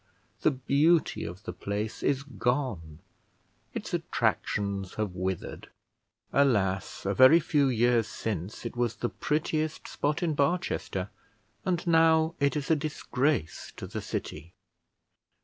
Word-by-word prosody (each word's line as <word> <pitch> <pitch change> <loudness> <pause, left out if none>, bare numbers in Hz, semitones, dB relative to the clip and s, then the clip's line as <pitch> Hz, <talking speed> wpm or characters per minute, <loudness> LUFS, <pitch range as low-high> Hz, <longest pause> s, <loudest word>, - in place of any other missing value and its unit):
The - - +5
beauty 145 +5 +2
of 90 +4 -8
the - - -5
place 105 +2 -4
is 140 -1 +1
gone; 120 - -2 0.8
its - - -5
attractions 100 -2 -1
have 105 -4 -2
withered. 95 0 -4 0.6
Alas! 100 -12 +1
a 100 - +1
very 130 +9 +8
few 145 -3 +2
years 120 -2 +3
since 105 +1 -4
it 115 - -5
was 120 -2 0
the 120 - -2
prettiest 155 +1 -1
spot 150 +4 -1
in 165 -3 +1
Barchester, 140 - -1 0.5
and 180 -3 0
now 160 -1 +4
it 140 0 +2
is 150 +1 -1
a - - +6
disgrace 140 - -1
to - - -6
the - - -5
city. 85 +3 -6
130 Hz, 130 wpm, -28 LUFS, 100-150 Hz, 0.8 s, very